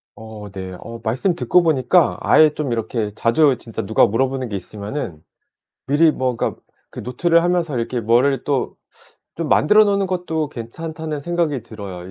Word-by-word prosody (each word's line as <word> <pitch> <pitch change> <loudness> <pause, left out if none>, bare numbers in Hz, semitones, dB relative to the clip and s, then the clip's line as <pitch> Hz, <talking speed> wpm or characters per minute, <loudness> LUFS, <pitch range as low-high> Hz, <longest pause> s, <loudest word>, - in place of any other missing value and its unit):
어 110 -1 -10
네. 95 -1 -7
어 115 0 -9
말씀 130 - 0
듣고 180 0 +3
보니까 160 +2 +3
'아예 155 -1 +6
좀 145 -5 -3
이렇게 110 -2 -2
자주 130 +5 +3
진짜 115 - -6
누가 110 - +4
물어보는 130 +3 -1
게 100 - -4
있으면은 100 - -6 0.7
미리 155 +4 +4
뭐 130 -4 -2
그러니까 - - -3 0.3
그 - - -8
노트를 165 +7 +2
하면서 175 -6 0
이렇게 120 +1 -2
뭐를 125 +4 +2
또 140 -3 -1 0.6
좀 165 -3 -3
만들어 210 +8 +5
놓는 200 -1 +1
것도 165 -4 -2
괜찮다.'는 155 +5 -6
생각이 165 -6 -1
들어요. 95 -5 -9
130 Hz, 340 characters per minute, -20 LUFS, 115-160 Hz, 0.7 s, 아예